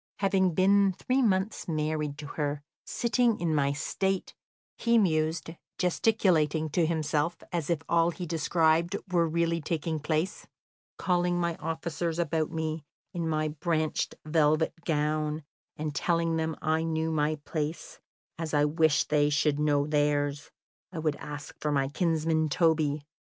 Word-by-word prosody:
"Having 190 -3 +2
been 195 +1 +4
three 255 +8 0
months 205 -2 0
married 155 -2 -2
to 145 - -7
her, 145 0 -3 0.2
sitting 235 -1 +1
in 170 -2 0
my 140 -2 +2
state," 190 +6 -2 0.4
he 235 0 +2
mused, 160 -4 +1 0.3
gesticulating 170 -5 +2
to 165 +1 +2
himself 160 0 0
as 170 -4 -2
if 165 -2 0
all 170 0 +3
he 175 +1 -5
described 165 +2 +2 0.2
were 170 -2 +3
really 165 0 0
taking 160 0 -2
place, 155 +4 -2 0.5
"calling 175 -1 +1
my 170 -1 0
officers 165 0 -3
about 160 -2 0
me, 160 -1 -3 0.3
in 170 -2 -2
my 155 -1 0
branched 155 +1 -1
velvet 155 0 +2
gown, 150 0 0 0.3
and 155 -1 -3
telling 165 +2 +1
them 160 -1 -1
I 160 +1 +1
knew 160 0 -1
my 155 0 +1
place, 150 +1 -5 0.4
as 160 -2 -2
I 145 0 +4
wished 155 0 +2
they 150 -1 +3
should 150 0 +1
know 145 -1 +2
theirs, 145 -1 0 0.4
I 180 - -8
would 155 -2 0
ask 145 0 -8
for 150 - -1
my 135 -2 +1
kinsman 160 -1 +1
Toby. 155 -2 +2
160 Hz, 145 wpm, -28 LUFS, 150-170 Hz, 0.5 s, been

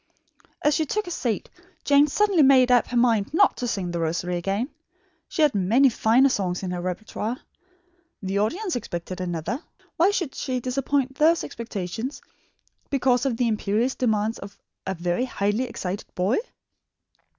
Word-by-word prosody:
As 295 - +4
she 310 +1 0
took 425 +8 -1
her 350 - -7
seat, 235 - -2 0.4
Jane 285 +1 +5
suddenly 395 +2 +2
made 260 -2 +6
up 245 -1 +4
her 245 - -2
mind 230 -4 +2
not 400 +3 +5
to 245 - -2
sing 190 -6 -2
The 170 - -3
Rosary 170 +2 -1
again. 195 - -1 0.6
She 315 - 0
had 295 -3 +4
many 225 +8 +4
finer 235 +3 +4
songs 185 -6 -1
in 185 - -3
her 180 -1 -3
repertoire. 210 +5 -4 0.9
The 195 +1 -1
audience 355 - -1
expected 185 -5 -5
another. 175 - -3 0.4
Why 345 +4 +5
should 350 -9 -1
she 255 -1 -2
disappoint 265 +1 -1
those 325 +2 +4
expectations 230 +3 -5 0.7
because 265 -1 +2
of 240 -4 -1
the 245 - +1
imperious 220 +3 0
demands 220 -2 0
of 200 +1 -10 0.3
a 190 - -1
very 175 +7 -1
highly 205 +1 -1
excited 195 -5 -5
boy? 190 - +1
235 Hz, 160 wpm, -24 LUFS, 195-270 Hz, 0.9 s, made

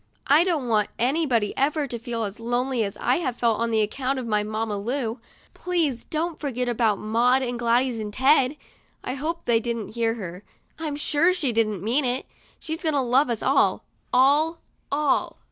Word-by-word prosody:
I 295 +4 +5
don't 325 -8 -1
want 215 -2 +2
anybody 250 -4 +1
ever 290 +2 +1
to 240 -3 -5
feel 230 -1 -3
as 205 +1 -5
lonely 245 +1 0
as 200 -1 -4
I 250 - +1
have 255 -8 -2
felt 230 -3 +1
on 230 0 0
account 255 +5 0
of 255 - -4
my 210 -2 +1
Mamma 215 0 -3
Lu. 230 +3 -3 0.3
Please 320 -10 -1
don't 325 +1 -2
forget 250 -4 -2
about 225 -3 +1
Maud 240 +5 +2
and 245 -1 -3
Gladys 240 0 +1
and 210 -1 -4
Ted." 270 +3 +3 0.5
I 250 - -3
hope 315 +5 -4
they 235 -1 +3
didn't 230 -2 -4
hear 230 -1 0
her; 180 -4 -7 0.4
I'm 310 -3 -3
sure 300 +4 +2
she 280 -9 0
didn't 215 -4 0
mean 245 +7 +2
it. 250 +1 -1 0.3
She's 320 +2 -5
going 315 -4 0
to - - +3
love 260 +2 +3
us 235 -2 -2
all, - - +2 0.3
all, 295 +6 +4 0.3
all 285 -1 +1
250 Hz, 185 wpm, -24 LUFS, 225-285 Hz, 0.5 s, I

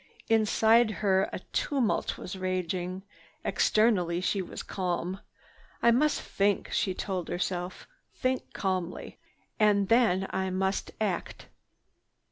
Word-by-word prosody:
Inside 225 +1 +4 0.2
her 190 -1 +3
a - - -3 0.2
tumult 265 -7 0
was 180 - -6
raging. 185 0 -2 0.4
Externally 190 -6 +2
she 190 +2 0
was 185 - -7
calm. 180 0 -2 0.6
"I 235 - +7
must 295 +5 +2
think," 200 0 0
she 190 -2 0
told 185 -3 -3
herself, 180 0 -3 0.2
"think 255 0 -2
calmly. 185 -2 -3 0.4
And 205 -2 +3
then 225 -5 +4
I 190 0 -1
must 190 +1 -1
act." 200 -5 -3
190 Hz, 110 wpm, -29 LUFS, 185-215 Hz, 0.6 s, I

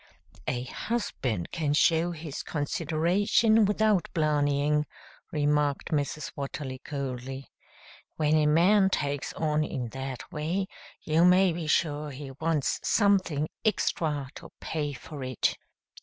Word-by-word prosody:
"A 125 -1 -1
husband 130 - -3
can 150 -4 0
show 165 +2 +3
his 155 -3 -6
consideration 180 +9 +2
without 210 -2 +2
blarneying," 150 -1 +2 0.5
remarked 150 -2 +1
Mrs. 150 0 -1
Watterly 135 -1 -5
coldly. 135 -1 -5 0.6
"When 155 -1 +1
a 155 -1 +4
man 190 +6 +5
takes 145 -5 -2
on 155 -1 +1
in 125 -5 -4
that 130 0 -6
way, 165 +5 -1 0.4
you 160 +2 +3
may 180 0 +5
be 165 -1 -4
sure 150 -1 +1
he 135 0 -8
wants 155 +1 0
something 185 -8 +2 0.2
extra 155 - 0
to - - -11
pay 150 -2 -3
for 140 +2 -8
it." 130 -2 0
150 Hz, 120 wpm, -28 LUFS, 140-170 Hz, 0.6 s, man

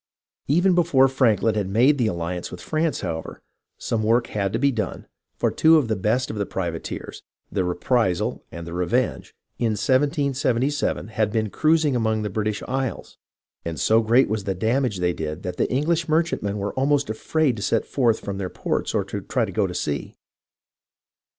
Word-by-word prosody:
Even 180 +6 +3
before 160 -7 +4
Franklin 115 -4 +2
had 100 -3 -1
made 130 +8 +4
the 120 - +2
alliance 85 -1 -3
with 90 - -9
France, 155 - -1
however, 80 -3 -5 0.4
some 115 - -2
work 115 +2 +3
had 105 -1 -2
been 140 +1 +2
done, 110 -5 -3 0.3
for - - +1
two 160 +1 +5
of 135 -7 0
the 110 - +1
best 110 +6 0
of 110 - -6
the 100 - -1
privateers, 85 -4 -5 0.3
the 95 - 0
Reprisal 90 +2 0
and 85 0 -7
the 85 - -7
Revenge, 110 +8 -1 0.2
in 115 -2 +1
1777 135 0 0
had 110 -1 0
been 110 -2 -1
cruising 155 -3 +2
among 110 -2 0
the 105 - -3
British 105 0 -2
isles, 130 -5 -3 0.4
and 80 -3 -4
so 110 +1 +4
great 115 +4 +4
was 105 -1 -2
the 95 - -1
damage 115 +2 0
they 90 -1 +1
did 80 +2 -5
that 90 -1 -4
the - - 0
English 160 +5 0
mer 160 +2 +4
chantmen 105 -11 -3
were 100 0 -3
almost 140 +1 +1
afraid 130 +5 0
to - - -6
set 115 +2 +1
forth 120 -5 +1
from 100 -1 -5
their 95 -2 -3
ports - - -2
or - - +2
to - - -5
try - - 0
to - - -7
go - - +1
to - - -7
sea. 70 -1 -3
110 Hz, 185 wpm, -23 LUFS, 100-135 Hz, 0.4 s, two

